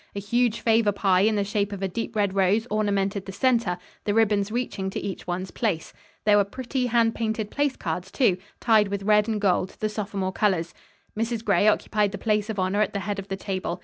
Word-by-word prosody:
A - - -2
huge 230 +3 0
favor 225 -2 +3
pie 195 -2 +2
in 215 +2 +3
the 205 - +1
shape 205 0 -1
of 200 -1 -5
a - - +1
deep 230 +4 -5
red 200 -2 +1
rose 195 +3 +2
ornamented 200 -2 0
the - - -5
center, 230 -4 +1 0.3
the 205 - 0
ribbons 210 -2 +2
reaching 225 -5 -2
to - - -4
each 195 -3 -6
one's 180 +1 -3
place. 195 -9 -2 0.3
There 210 -1 +6
were 205 - +5
pretty, 250 +5 -3
hand 230 -1 +3
painted 220 -2 -2
place 285 -2 0
cards, 175 +3 -4
too, 220 -10 +2 0.2
tied 220 -3 +4
with 200 0 -3
red 210 +1 +4
and 220 -2 -1
gold, 190 -2 +1
the 215 - 0
sophomore 200 -3 -3
colors. 185 -6 0 0.4
Mrs. 225 +1 -2
Gray 200 0 +3
occupied 210 -1 +2
the - - -3
place 210 -1 0
of 220 - -3
honor 190 +2 +1
at 215 - 0
the 200 - -2
head 200 0 -3
of 195 - -7
the 195 - -4
table. 185 -2 -3
205 Hz, 220 wpm, -25 LUFS, 195-220 Hz, 0.4 s, There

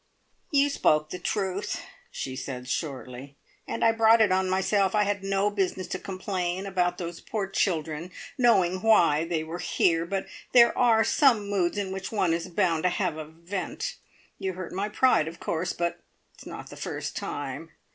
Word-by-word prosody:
"You 285 -1 +4
spoke 155 - +2
the 180 - -5
truth," 200 +1 -2 0.3
she 130 -1 -5
said 125 -1 -6
shortly. 135 -1 -5 0.3
"And - - -1
I 225 - +6
brought 225 0 +5
it 215 -3 +4
on 185 0 +2
myself. 190 +1 +2
I 210 - +4
had 200 -1 -1
no 195 +1 +1
business 190 -2 -1
to - - -3
complain 185 -1 -3
about 180 -2 0
those 170 -1 -6
poor 210 -3 -3
children, 165 -4 -1 0.3
knowing 185 -8 +3
why 170 -8 +4
they 165 -2 -1
were 165 +2 -6
here; 165 -1 +1
but 195 +1 -2 0.3
there 235 -1 +7
are 230 -3 +4
some 235 -9 +3
moods 185 -1 +1
in 195 -2 -2
which 190 0 -5
one 185 -6 +1
is 165 0 -2
bound 170 -3 +1
to 180 - +2
have 180 -3 -1
a 155 -1 -6
vent. 170 +5 -5 0.4
You 190 -1 -2
hurt 185 -1 -7
my 200 +3 -2
pride, 210 -7 +3
of 165 +1 -8
course, 170 +2 -2
but 170 0 -2 0.3
it's - - -14
not - - -8
the - - -9
first - - -5
time!" - - -5
185 Hz, 180 wpm, -27 LUFS, 165-205 Hz, 0.4 s, there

